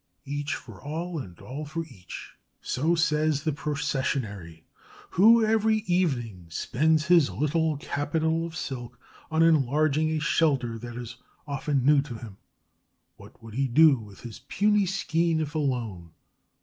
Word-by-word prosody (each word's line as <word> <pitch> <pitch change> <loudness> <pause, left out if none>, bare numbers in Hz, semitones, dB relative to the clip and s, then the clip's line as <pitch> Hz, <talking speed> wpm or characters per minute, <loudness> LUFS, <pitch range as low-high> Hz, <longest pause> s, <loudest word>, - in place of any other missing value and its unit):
Each 145 +1 -3
for - - -11
all 165 +3 -4
and 90 -10 -9
all 140 +4 -7
for 160 +2 -4
each. 90 - -10 0.3
So 160 +6 0
says 155 -3 +1
the 155 - +1
Processionary, 130 - -3 0.5
who 225 +5 +6
every 220 0 +2
evening 120 - -1
spends 155 - +1
his 170 -5 +5
little 155 +1 0
capital 160 +3 -1
of 165 -1 -6
silk 125 -5 -6 0.3
on 160 0 +3
enlarging 155 0 +3
a 160 0 0
shelter 140 -7 +1
that 120 +1 -8
is 120 0 -7 0.3
often 140 -2 -1
new 145 0 +6
to 135 -4 -7
him. 110 -4 -10 0.8
What - - -16
would 115 -1 -10
he 135 +3 0
do 145 +1 +6
with 105 -3 -13
his 120 -2 -9
puny 205 0 +1
skein, 165 -3 0
if 155 -1 -3
alone? 120 - -2
150 Hz, 145 wpm, -27 LUFS, 125-160 Hz, 0.8 s, who